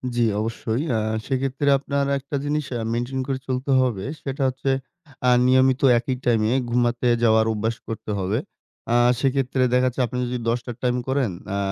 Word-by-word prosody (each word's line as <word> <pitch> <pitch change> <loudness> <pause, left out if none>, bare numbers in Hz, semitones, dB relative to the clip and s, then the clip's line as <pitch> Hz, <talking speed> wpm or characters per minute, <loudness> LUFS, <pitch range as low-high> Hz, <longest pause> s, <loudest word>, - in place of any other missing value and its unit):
জি, 120 - +1 0.2
অবশ্যই। 115 +3 -2
আ - - +2 0.3
সেক্ষেত্রে 135 +1 -1
আপনার 140 0 -1
একটা 140 +2 -6
জিনিস 150 0 -1
আ - - -3
মেইনটেইন 120 +3 -2
করে 135 -1 -2
চলতে 130 +1 -2
হবে। 110 -7 -1 0.2
সেটা 135 0 -4
হচ্ছে 130 +1 -3 0.6
আ - - +6 0.2
নিয়মিত 130 0 +4 0.2
একই 125 +2 -1
টাইম 115 -3 +3 0.3
ঘুমাতে 120 0 +1 0.2
যাওয়ার 110 -1 +4
অভ্যাস 110 +2 -1
করতে 110 -1 -5
হবে। 95 +3 0 0.6
আ - - +4 0.2
সেক্ষেত্রে 135 -1 +1
দেখা 125 0 +4
যাচ্ছে 125 +1 -2
আপনি 125 - -5
যদি 125 0 -3
১০ 120 +1 +1
টার 120 - -6
টাইম 125 -1 +2
করেন, 130 -6 0 0.2
আ - - -1
125 Hz, 175 wpm, -23 LUFS, 115-135 Hz, 0.6 s, আ